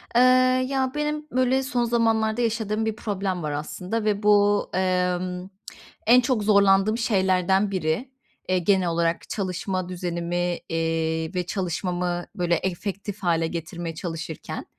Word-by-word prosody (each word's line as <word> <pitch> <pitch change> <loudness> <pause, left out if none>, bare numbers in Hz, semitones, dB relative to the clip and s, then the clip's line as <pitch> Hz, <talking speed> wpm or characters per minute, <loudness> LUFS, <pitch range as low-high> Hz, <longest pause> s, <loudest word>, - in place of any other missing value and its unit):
Eee, 245 - +6 0.5
ya, 265 -1 0
benim, 300 0 -2
böyle, 255 +1 +2
son 250 -2 0
zamanlarda 225 -1 +1
yaşadığım 220 -2 -1
bir 220 -1 -1
problem 195 -5 -3
var, 150 - -2
aslında, 180 +9 -3
ve 210 -1 0
bu, 205 0 +4
emm, 180 0 -1 0.6
en 245 +3 +7
çok 245 -3 0
zorlandığım 200 +1 +4
şeylerden 190 -3 +2
biri, 185 - -1 0.4
eee, 185 0 +3
genel 190 0 +2
olarak 170 0 -1
çalışma 185 -1 -3
düzenimi, 175 -1 -2
eee, 165 0 -1
ve 180 -1 -1
çalışmamı, 180 -1 -2
böyle, 175 -3 +1
efektif 200 +2 -4
hâle 165 -2 +2
getirmeye 165 0 -5
çalışırken. 165 -1 -6
190 Hz, 130 wpm, -24 LUFS, 175-215 Hz, 0.6 s, en